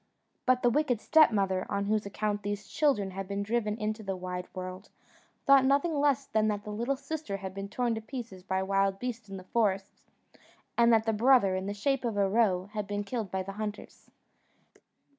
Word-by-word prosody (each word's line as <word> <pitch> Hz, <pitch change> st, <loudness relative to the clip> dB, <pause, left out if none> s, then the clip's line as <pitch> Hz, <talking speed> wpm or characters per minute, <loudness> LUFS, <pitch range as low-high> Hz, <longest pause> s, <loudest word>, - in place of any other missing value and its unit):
But 255 Hz, 0 st, +3 dB
the 245 Hz, -, +4 dB
wicked 260 Hz, -4 st, +1 dB
stepmother, 200 Hz, -, +3 dB
on 200 Hz, 0 st, -1 dB
whose 210 Hz, 0 st, 0 dB
account 205 Hz, +1 st, -2 dB
these 205 Hz, 0 st, -4 dB
children 225 Hz, -11 st, +1 dB
had 195 Hz, 0 st, -5 dB
been 200 Hz, +1 st, -2 dB
driven 215 Hz, 0 st, -1 dB
into 215 Hz, 0 st, -2 dB
the 195 Hz, -2 st, -3 dB
wide 180 Hz, 0 st, -5 dB
world, 185 Hz, +1 st, -6 dB, 0.6 s
thought 275 Hz, -2 st, +7 dB
nothing 280 Hz, +5 st, +2 dB
less 285 Hz, -2 st, +2 dB
than 215 Hz, -3 st, +1 dB
that 205 Hz, -1 st, -1 dB
the 210 Hz, -, -6 dB
little 235 Hz, +6 st, -1 dB
sister 285 Hz, -5 st, -5 dB
had 190 Hz, -1 st, -6 dB
been 195 Hz, +1 st, -6 dB
torn 240 Hz, +2 st, 0 dB
to 220 Hz, -, -4 dB
pieces 225 Hz, -5 st, -7 dB
by 190 Hz, +1 st, -1 dB
wild 195 Hz, 0 st, +1 dB
beasts 230 Hz, -2 st, -5 dB
in 195 Hz, -, -6 dB
the 185 Hz, -, -9 dB
forest, 195 Hz, -2 st, -1 dB, 0.7 s
and 235 Hz, 0 st, +5 dB
that 225 Hz, -1 st, +4 dB
the 225 Hz, -, +1 dB
brother, 225 Hz, -4 st, +4 dB
in 190 Hz, +1 st, -3 dB
the 205 Hz, -, -2 dB
shape 270 Hz, +5 st, 0 dB
of 230 Hz, -4 st, -2 dB
a 200 Hz, -1 st, +3 dB
roe, 190 Hz, -3 st, +2 dB
had 210 Hz, -2 st, -3 dB
been 205 Hz, +1 st, -2 dB
killed 215 Hz, -1 st, -4 dB
by 190 Hz, +1 st, -2 dB
the 195 Hz, -, -6 dB
hunters. 210 Hz, -1 st, -7 dB
210 Hz, 200 wpm, -29 LUFS, 195-240 Hz, 0.7 s, thought